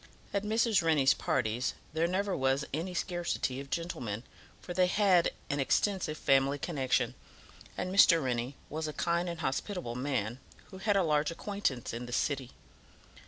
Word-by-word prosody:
At 200 - +1
Mrs. 220 -1 +2
Rennie's 150 -5 +4
parties 120 0 -1 0.2
there 160 +1 +2
never 195 +2 0
was 135 +1 +1
any 175 +5 -3
scarcity 175 -7 -1
of 140 0 -8
gentlemen, 125 -11 -3 0.4
for 175 - -7
they 180 0 +3
had 185 -3 +4 0.2
an 140 0 -1
extensive 180 +3 +1
family 135 +1 +3
connection, 140 -4 0 0.6
and 185 +1 -2
Mr. 175 -4 +7
Rennie 125 +1 -2
was 155 +1 -3
a 155 - -4
kind 170 +2 0
and 170 -1 -5
hospitable 150 - -2
man, 125 -3 -2 0.3
who 190 - -9
had 205 +1 +2
a 195 - +3
large 150 -2 +2
acquaintance 165 - -2
in 120 +1 -5
the 120 - -6
city. 135 -1 0
155 Hz, 160 wpm, -31 LUFS, 130-180 Hz, 0.6 s, Mr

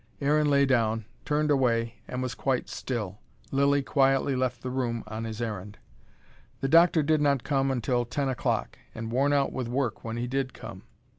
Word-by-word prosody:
Aaron 150 +1 +2
lay 140 -1 +4
down, 115 -4 +1 0.2
turned 150 0 +1
away, 120 -4 +1
and 125 0 -3
was 125 -1 -3
quite 125 +3 -1
still. 105 -6 -4 0.3
Lilly 140 +1 +3
quietly 135 0 +2
left 125 -1 -1
the 125 - -3
room 120 -3 -2
on 110 +1 -5
his 110 +1 -4
errand. 105 -2 -5 0.8
The 135 - -1
doctor 165 +1 +5
did 155 +1 +2
not 140 -4 +2
come 135 -1 +1
until 125 -1 0
ten 140 +3 -2
o'clock: 130 -1 -1 0.2
and 115 0 -5
worn 135 +4 +2
out 140 -1 +2
with 130 -2 -3
work 125 -2 -2
when 115 0 -4
he 120 - -2
did 130 0 -2
come. - - -9
130 Hz, 180 wpm, -27 LUFS, 115-140 Hz, 0.8 s, doctor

